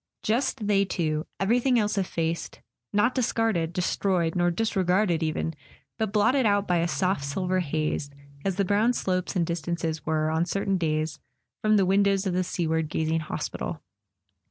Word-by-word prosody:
Just 225 -1 0
they 200 -1 +3
two: 155 -5 -1
everything 245 +5 +3
else 210 -2 +1
effaced; 170 -4 -2 0.3
not 210 +5 +3
discarded, 225 -9 0
destroyed, 180 -1 0
not 175 -1 +1
disregarded 190 -4 +1
even, 160 0 -1 0.5
but 220 -2 0
blotted 225 +6 +3
out 205 -2 +2
by 180 - +2
a 170 0 +1
soft 185 -2 0
silver 185 +6 -1
haze, 155 -3 -1 0.3
as 195 -2 0
the 200 +1 +1
brown 210 +5 +3
slopes 185 -3 -1
and 175 -2 +2
distances 165 -1 -3
were, 155 0 0
on 160 +2 +1
certain 195 -1 0
days, 155 -1 -1 0.4
from 215 0 +4
the 195 - +4
windows 195 +1 +3
of 190 - 0
the 180 - +1
sea¬ 175 -2 -2
ward 160 -1 0
gazing 160 +1 0
hospital. 155 - -4
185 Hz, 160 wpm, -26 LUFS, 160-205 Hz, 0.5 s, from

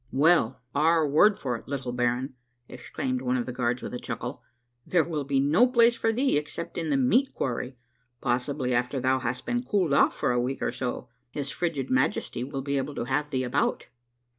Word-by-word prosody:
" 125 - -34
Well, 135 -8 +4
our 160 +2 +3
word 195 +9 +5
for 125 -3 -2
it, - - -16
little 130 -3 -3
baron," 125 +2 -1 0.3
exclaimed 130 -1 -4
one 130 0 0
of 120 - -2
the - - -5
guards 125 0 -1
with - - -6
a 125 - -3
chuckle, - - -5 0.2
" 120 - -49
there 175 -3 +3
will 150 -4 -3
be 140 -1 +1
no 155 - +4
place 235 -1 +5
for 225 - +1
thee 255 - +2
except 155 +3 -7
in 165 -2 -2
the 140 - +2
meat 240 - +2
quarry. 125 0 -3 0.4
Possibly 125 +1 -1
after 125 +3 0
thou 130 +1 +2
hast 125 +1 -3
been 245 0 0
cooled 195 - 0
off - - +4
for - - 0
a 120 0 +1
week 130 +2 -3
or - - 0
so, 125 -1 -4 0.2
his 140 +1 -4
frigid 150 -7 -2
Majesty 130 -1 0
will 135 0 -5
be 140 0 -1
able 140 +2 -3
to - - -2
have 145 +4 -1
thee 130 -3 -1
about 125 - -1
135 Hz, 215 wpm, -27 LUFS, 125-155 Hz, 0.4 s, word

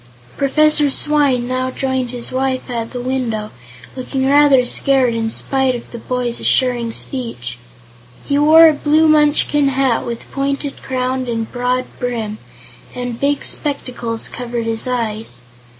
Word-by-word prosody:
Professor 300 +1 +3
Swyne 280 -4 +1
now 255 0 -1
joined 260 -1 -2
his 240 -1 -4
wife 260 0 -2
at 230 -1 -3
the 250 - -6
window, 245 -4 -2 0.4
looking 265 +1 -2
rather 280 -2 +5
scared 260 -1 +2
in 225 -1 -1
spite 265 +2 0
of 240 - -9
the 235 - -7
boy's 245 0 -3
assuring 245 -3 +2
speech. 225 - -3 0.7
He 280 0 +1
wore 320 +2 +8
a 315 - +4
blue 305 +2 +3
Munchkin 295 -1 +3
hat, 270 -3 +1
with 235 -1 -7
pointed 275 0 -3
crown 255 0 -2
and 225 -2 -3
broad 250 +1 -1
brim, 225 -4 -3 0.6
and 245 -1 -4
big 285 0 0
spectacles 245 -6 -3
covered 240 -1 -4
his 225 +2 -2
eyes. 220 - -3
255 Hz, 140 wpm, -17 LUFS, 235-275 Hz, 0.7 s, wore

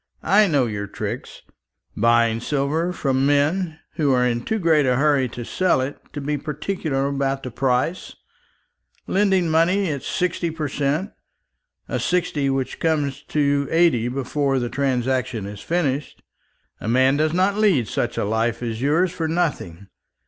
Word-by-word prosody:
I 205 +2 +5
know 145 -7 +2
your 105 -3 -4
tricks: - - -6 0.5
buying 115 0 +3
silver 150 +7 -1
from 135 -6 0
men 155 +4 +1 0.2
who 150 -4 +2
are 125 -1 +3
in 120 -1 0
too 220 - -2
great 160 -7 +3
a 125 - +3
hurry 140 -2 +2
to 120 +1 -7
sell 185 0 +1
it 130 +2 -3
to 145 - -4
be 145 +1 -2
particular 150 -2 -2
about 135 -1 -1
the 130 - -5
price; 130 +7 -1 0.9
lending 190 -3 +2
money 170 +3 +2
at 140 -2 -4
sixty 175 +2 -1
per 160 -2 -3
cent, 145 +8 -1 0.8
a - - -2
sixty 160 -6 0
which 135 -1 -2
comes 145 -4 0
to 140 -1 +1
eighty 165 -9 +3
before 135 +2 -1
the 120 -2 -1
transaction 130 -4 -1
is 100 0 -8
finished. 150 -5 -2 0.6
A - - -6
man 130 +4 +3
does 155 +1 +1
not 185 +4 +2
lead 185 - +3
such - - -2
a - - 0
life 115 +3 -1
as 115 -1 -3
yours 165 +6 +2
for 165 -2 -3
nothing. 150 - -2
140 Hz, 155 wpm, -22 LUFS, 125-165 Hz, 0.9 s, I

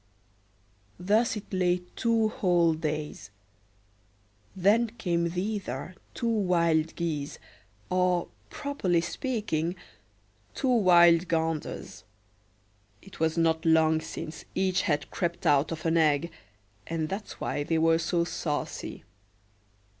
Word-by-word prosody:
Thus 215 +6 +2
it 205 - -10
lay 180 -1 +1
two 230 -2 +2
whole 175 -6 +2
days; 155 - -4 1.3
then 205 +6 +3
came 170 -2 0
thither 185 - -4 0.2
two 235 - -2
wild 170 -7 +2
geese, 155 -4 -3 0.5
or, 180 -1 +1 0.2
properly 280 - -1
speaking, 175 - -2 0.8
two 265 - 0
wild 175 -5 +6
ganders. 160 -2 -3 1.0
It 195 - -14
was 160 +1 +1
not 160 -1 +2
long 160 -1 +4
since 155 0 -7
each 190 0 +1
had 145 -1 -1
crept 175 0 -3
out 145 -1 +3
of 160 0 -6
an 165 0 +2
egg, 160 +1 +2 0.6
and 160 -1 -2
that's 195 +5 -6
why 145 - -2
they 160 +2 0
were 165 0 +3
so 170 +1 +1
saucy. 150 -3 -4
170 Hz, 110 wpm, -28 LUFS, 160-190 Hz, 1.3 s, wild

